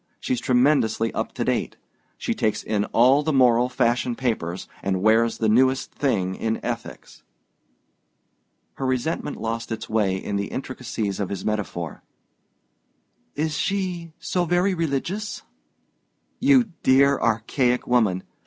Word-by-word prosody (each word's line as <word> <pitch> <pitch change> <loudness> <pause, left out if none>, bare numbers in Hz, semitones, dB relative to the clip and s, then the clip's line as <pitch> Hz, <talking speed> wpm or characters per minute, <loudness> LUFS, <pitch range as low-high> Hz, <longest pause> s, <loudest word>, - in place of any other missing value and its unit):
She's 125 - -1
tremendously 125 -3 +2
up - - -3
to - - -2
date. - - -1 0.4
She - - -2
takes 110 0 -1
in 105 -1 0
all 130 +5 +4
the 155 +1 -1
moral 125 -3 +4
fashion 125 -1 +1
papers, 105 -9 -2
and 95 -1 -1
wears 115 +1 +3
the 110 - 0
newest 130 +4 +3
thing 100 -10 0
in 110 +3 -2
ethics." - - -6 1.6
Her 135 - -3
resentment 130 +4 -2
lost 115 +1 -3
its 115 - -4
way 105 -4 +1
in 100 +1 -3
the 100 0 -2
intricacies 115 -6 -4
of 100 - -2
his 100 - -5
metaphor. 95 -7 -3 1.3
"Is 155 +1 -1
she 180 0 -2
so 180 - -1
very 175 +3 +2
religious?" 175 +6 -3 1.0
"You 260 -5 +4
dear 140 +1 +4
archaic 120 +3 +1
woman! 110 -7 +2
125 Hz, 130 wpm, -24 LUFS, 110-140 Hz, 1.6 s, all